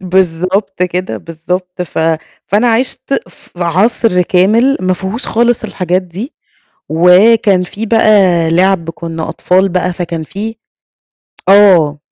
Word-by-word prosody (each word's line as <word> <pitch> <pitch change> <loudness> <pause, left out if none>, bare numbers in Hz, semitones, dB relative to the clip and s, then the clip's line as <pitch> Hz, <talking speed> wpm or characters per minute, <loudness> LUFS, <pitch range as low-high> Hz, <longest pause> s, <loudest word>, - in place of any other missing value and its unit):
بالضبط 185 +1 -1
كده، 180 -8 -3
بالضبط. 180 - -5
ف 175 - -7 0.5
فأنا 220 +4 +2
عشت 260 +3 -1
في - - -15
عصر 185 +2 +1
كامل 215 +10 +2
ما 185 0 0
فيهوش 190 +6 -4
خالص 240 +1 +1
الحاجات 180 0 -2
دي، 185 - -8 0.6
وكان 185 +4 +4
فيه 210 +5 -6
بقى 195 -7 +3
لعب 180 -1 +1
كنا 165 0 -6
أطفال 185 +2 +1
بقى، 180 0 -1
فكان 170 -2 -5
في 215 +7 -6 0.9
آه، 180 -7 +5
185 Hz, 120 wpm, -13 LUFS, 175-210 Hz, 0.9 s, آه